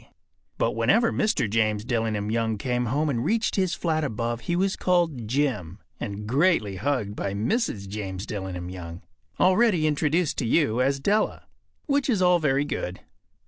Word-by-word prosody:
But - - +1
whenever 200 - +3
Mr. 215 - +1
James 110 0 0
Dillingham 110 -4 -1
Young 115 -1 0
came 125 +2 -1
home 145 +7 0
and 120 -5 -1
reached 225 - +1
his 185 -4 +1
flat 155 -2 0
above 120 -2 -2
he 175 - -1
was 190 +2 +1
called 165 -10 0
“Jim” 120 - -1 0.2
and 105 -2 -5
greatly 130 - +2
hugged 115 -4 -1
by 100 -2 -3
Mrs. 110 - -1
James 95 -1 -5
Dillingham 95 -4 -5
Young, 85 -2 -8 0.4
already 185 -3 +4
introduced 155 +2 +1
to - - -1
you 125 -3 +2
as 135 +1 +1
Della. 205 +9 0 0.4
Which 280 -1 +1
is 220 -6 +2
all 180 -1 +4
very 140 -2 +1
good. 90 -9 -4
125 Hz, 160 wpm, -25 LUFS, 105-175 Hz, 0.4 s, already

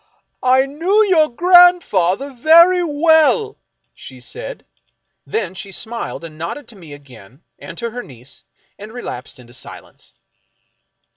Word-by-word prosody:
" - - -53
I 260 +1 +3
knew 345 +10 +1
your 330 -7 +3
grandfather 285 - +3
very 335 +8 +5
well," 320 +7 +2 0.3
she - - -13
said. - - -8 0.6
Then 190 -5 -3
she 195 +1 -9
smiled 230 -2 -6
and 155 -2 -11
nodded 170 - -6
to 230 - -14
me 165 -7 -13
again, 130 - -16 0.2
and - - -11
to 235 -1 -5
her 245 +2 -6
niece, 130 - -15 0.4
and 210 +2 -10
relapsed 220 - -8
into 120 -1 -16
silence. 130 - -11
245 Hz, 135 wpm, -17 LUFS, -, 0.6 s, very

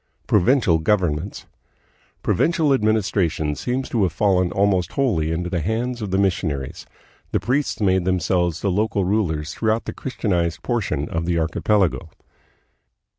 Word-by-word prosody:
Provincial 95 - +3
Governments. 90 0 -1 0.8
Provincial 160 -4 +2
administration 100 - +1
seems 125 - -3
to 115 - 0
have 95 -3 +2
fallen 90 0 +2
almost 95 -3 +1
wholly 95 - +1
into 85 +2 -2
the 90 -2 -2
hands 120 +6 -2
of 105 - -3
the 95 - 0
missionaries. 85 -9 -1 0.4
The - - 0
priests 135 +3 -1
made 95 -3 +2
themselves 90 -2 0
the 100 - 0
local 100 0 0
rulers 85 -6 -1
throughout 110 0 0
the - - -5
Christianized 90 - -2
portion 70 +2 -1
of 85 0 -2
the 85 -1 +1
archipelago. 85 +1 +1
95 Hz, 135 wpm, -22 LUFS, 85-110 Hz, 0.8 s, Provincial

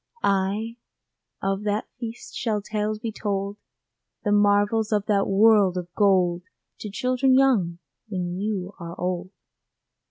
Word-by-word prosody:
Ay, 200 +4 0 0.7
of 195 0 0
that 210 +1 -1
feast 230 -1 -7
shall 220 -3 -1
tales 210 +1 -2
be 220 +1 -4
told, 200 -1 -3 0.7
The 205 - 0
marvels 205 +2 +3
of 205 -1 +1
that 200 -2 +2
world 200 -2 +5
of 175 -1 -6
gold 185 -4 +3 0.4
To 210 - -6
children 255 +5 +2
young, 215 -11 +3 0.3
when 180 -4 -3
you 200 -2 -3
are 170 -1 -8
old. 180 0 -2
205 Hz, 130 wpm, -25 LUFS, 190-220 Hz, 0.7 s, world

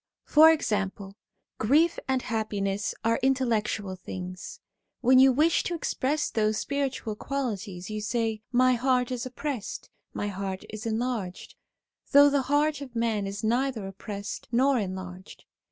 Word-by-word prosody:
For 315 +1 +7
example, 200 -8 -2 0.4
grief 300 +10 +3
and 265 -1 0
happiness 205 -3 -2
are 230 0 +2
intellectual 230 -7 0
things; 185 0 -7 0.4
when 255 +1 +6
you 265 0 +7
wish 310 +6 +3
to 350 - -1
express 295 -1 -1
those 215 -1 +1
spiritual 270 -6 -2
qualities 210 -8 -4
you 215 0 -3
say: 220 0 -1
' - - -57
My 255 - +5
heart 250 0 +1
is 250 0 -3
oppressed; 255 -3 -5 0.2
my 205 - -3
heart 195 -1 -4
is 215 +1 -6
enlarged 225 -5 -3 0.3
'; - - -36
though 285 0 +8
the 280 -1 +2
heart 295 0 +2
of 260 -4 -9
man 225 -3 0
is 200 +3 -6
neither 240 -1 0
oppressed 200 +1 -6
nor 260 +2 +3
enlarged. 185 -1 -7
230 Hz, 145 wpm, -27 LUFS, 200-265 Hz, 0.4 s, though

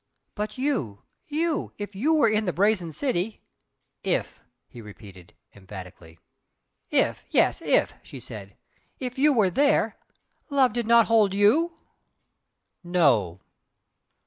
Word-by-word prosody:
"But 210 +3 -5
YOU 235 - -2 0.2
you 315 +1 -2
if 205 0 -6
you 265 +11 +1
were 290 -7 +4
in 215 0 +1
the 180 - 0
Brazen 190 -3 +1
City 220 - -3 0.3
" - - -54
"If!" - - -10 0.3
he 120 - -12
repeated, 100 -4 -14 0.2
emphatically. 90 -4 -12 0.7
"If - - +1
yes! - - +2
if" - - +2
she - - -11
said 100 -2 -9 0.4
"If 255 0 -5
you 300 +2 +5
were 215 -8 +2
there, 285 +6 +2 0.5
love 270 -5 +3
did 240 -2 -2
not 235 -1 +6
hold 215 -4 +3
YOU?" 310 +12 +3 1.1
"No!" 130 - +1
205 Hz, 125 wpm, -25 LUFS, -, 1.1 s, not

